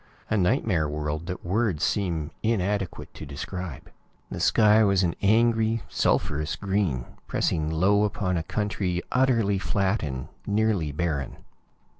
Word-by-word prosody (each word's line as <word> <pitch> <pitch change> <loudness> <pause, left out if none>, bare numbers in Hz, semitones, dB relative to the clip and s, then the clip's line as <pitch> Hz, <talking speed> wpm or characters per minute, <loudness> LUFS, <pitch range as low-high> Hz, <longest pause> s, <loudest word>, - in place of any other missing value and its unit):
A - - +3
nightmare 95 - +1
world 75 +2 -3
that 90 -1 -5
words 95 -3 0
seem 85 -6 0
inadequate 100 -4 -1
to - - -9
describe. 80 +3 -6 0.4
The - - -4
sky 110 0 +5
was 100 -2 +3
an 85 -2 +1
angry, 115 +1 +3
sulphurous 75 +4 0
green, 95 -10 -1 0.2
pressing 80 -1 0
low 95 +6 +3
upon 100 -3 -1
a 85 - 0
country 95 -1 -2
utterly 115 -6 +2
flat 95 +4 0
and 65 -4 -4 0.2
nearly 105 -7 +1
barren. 75 -3 -2
95 Hz, 130 wpm, -26 LUFS, 80-105 Hz, 0.4 s, sky